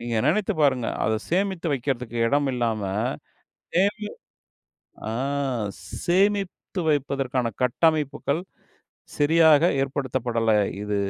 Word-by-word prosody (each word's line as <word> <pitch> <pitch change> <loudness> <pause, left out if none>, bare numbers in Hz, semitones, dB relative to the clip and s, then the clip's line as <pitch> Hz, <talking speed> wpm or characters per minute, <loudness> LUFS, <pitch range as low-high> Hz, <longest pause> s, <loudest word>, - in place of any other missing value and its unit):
நீங்க 115 -1 -3
நெனைச்சு 195 +6 +2
பாருங்க 130 -5 +3 0.2
அதை 110 0 +1
சேமித்து 190 -1 0
வைக்கிறதுக்கு 125 -3 -2
எடம் 140 +3 +2
இல்லாம. 115 -4 -1 0.9
சேமி 205 +3 +1 1.0
ஆ - - -2 0.9
சேமித்து 195 +1 0
வைப்பதற்கான 135 -4 0
கட்டமைப்புகள் 150 +3 +1 0.8
சரியாக 160 0 +5 0.2
ஏற்படுத்தப்படல 125 -4 -1 0.3
இது 105 0 -2
140 Hz, 85 wpm, -24 LUFS, 125-170 Hz, 1.0 s, சரியாக